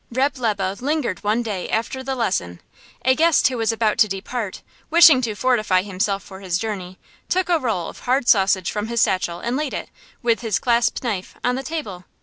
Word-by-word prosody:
Reb' 265 +4 0
Lebe 200 -4 -1
lingered 270 - -1
one 215 +3 +1
day 205 -5 -4
after 230 +4 -2
the 265 0 -3
lesson. 175 - -2 0.5
A 260 - +5
guest 325 +3 +4
who 255 - -4
was 225 0 +1
about 225 -1 0
to 215 - +6
depart, 200 +2 -5 0.3
wishing 320 -5 +7
to 225 -4 -2
fortify 215 -6 +2
himself 195 0 -2
for 190 -1 -11
his 185 -3 -1
journey, 185 -3 -5 0.3
took 370 -1 0
a 340 -2 +3
roll 215 - -2
of - - -10
hard 255 0 0
sausage 190 -3 +3
from 210 0 -3
his 235 0 -1
satchel 175 -4 +1
and 240 +2 -2
laid 295 0 -2
it, - - -5 0.3
with 235 -1 +2
his 225 -4 0
clasp 235 0 +1
knife, 205 -7 -3
on 245 - +2
the 260 - -2
table. 220 - -6
225 Hz, 200 wpm, -21 LUFS, 195-255 Hz, 0.5 s, wishing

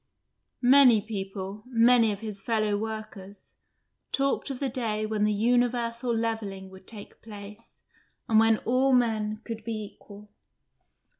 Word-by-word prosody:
Many 250 -3 +7
people 195 -1 -6
many 235 -2 +4
of 200 0 -6
his 210 -3 -7
fellow 215 -1 0
workers 210 -2 -7 0.5
talked 275 +1 0
of 265 -2 -5
the 275 - -1
day 225 -4 -2
when 215 -1 0
the 210 - +2
universal 240 +2 +1
levelling 220 -4 -3
would 190 0 -15
take 210 -3 -11
place 210 0 -12 0.5
and 220 -3 +4
when 225 0 +4
all 260 +3 +2
men 215 -3 +1
could 225 -2 -7
be 225 -1 -4
equal. 205 0 -15
220 Hz, 135 wpm, -27 LUFS, 210-235 Hz, 0.5 s, Many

